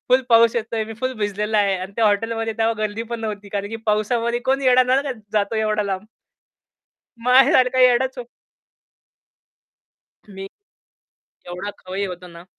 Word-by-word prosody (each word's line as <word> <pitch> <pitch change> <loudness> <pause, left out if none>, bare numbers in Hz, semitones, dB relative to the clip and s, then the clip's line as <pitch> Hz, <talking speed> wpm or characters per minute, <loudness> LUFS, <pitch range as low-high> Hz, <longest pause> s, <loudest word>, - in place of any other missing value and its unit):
फुल 255 +1 +5
पाऊस 230 0 +5
येतोय 225 -1 -2
मी 225 0 -8
फुल 255 0 -1
भिजलेला 210 +1 -1
आहे 200 -2 +2
आणि 185 +2 -7
त्या 230 - +2
हॉटेलमध्ये 225 +2 0
तेव्हा 225 0 +2
गर्दी 215 +2 -2
पण 230 - -4
नव्हती 210 -2 -5
कारण 200 0 -4
की 225 - -5
पाऊसामध्ये 230 +3 0
कोण 270 +1 +2
येणार 255 0 +5
ना 260 +2 +3
का 275 -2 -3 0.2
जातो 210 0 0
एवढा 215 -1 0
लांब? 195 0 -4 1.2
माझ्यासारखा 255 0 +4
येडाच 250 +1 +5
हो - - -4 2.1
मी, 195 -1 -9 1.0
एवढा 180 +3 -5
खवय्ये 190 +2 -4
होतो 180 0 -9
ना 170 0 -13
220 Hz, 155 wpm, -21 LUFS, 200-240 Hz, 2.1 s, फुल